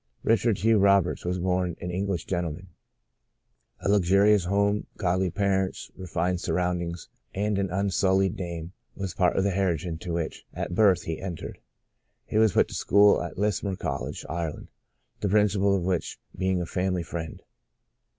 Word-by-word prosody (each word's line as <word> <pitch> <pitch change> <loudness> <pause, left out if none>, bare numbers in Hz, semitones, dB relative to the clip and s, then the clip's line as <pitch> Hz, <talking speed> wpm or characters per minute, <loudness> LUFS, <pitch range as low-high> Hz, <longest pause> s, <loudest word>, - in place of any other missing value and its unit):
Richard 115 -1 +2
Hugh 110 0 +3
Roberts 100 -3 +3
was 90 +1 -1
born 90 -1 0
an 90 - -4
Eng 95 +3 -2
lish 90 -5 -2
gentleman. 90 0 -3 1.1
A - - -2
luxurious 100 0 +4
home, 100 +2 +1
godly 95 -1 +1
parents, 95 0 -1
refined 90 0 -2
surroundings 85 0 -2 0.3
and 105 +1 0
an 100 - 0
unsul 95 0 +1
lied 95 -1 +1
name 85 -1 -6 0.2
was 95 -2 -4
part 90 -1 +2
of 95 - +3
the 100 - +1
heritage 90 -4 0
into 85 0 -4
which, 85 -2 -3
at - - -3
birth, 100 -1 +4
he 80 -1 -4
entered. 90 -4 -6 0.7
He 110 - 0
was 110 -4 +4
put - - +4
to - - -9
school 100 +1 +4
at 85 - -6
Lismore 100 -1 0
College, 70 -7 -4
Ireland, 85 -2 -4 0.5
the 100 - -1
principal 100 -1 +3
of 95 - -1
which 90 -2 -1 0.2
being 95 -1 0
a - - -2
family 90 0 -1
friend. 80 0 -6
95 Hz, 160 wpm, -26 LUFS, 85-100 Hz, 1.1 s, luxurious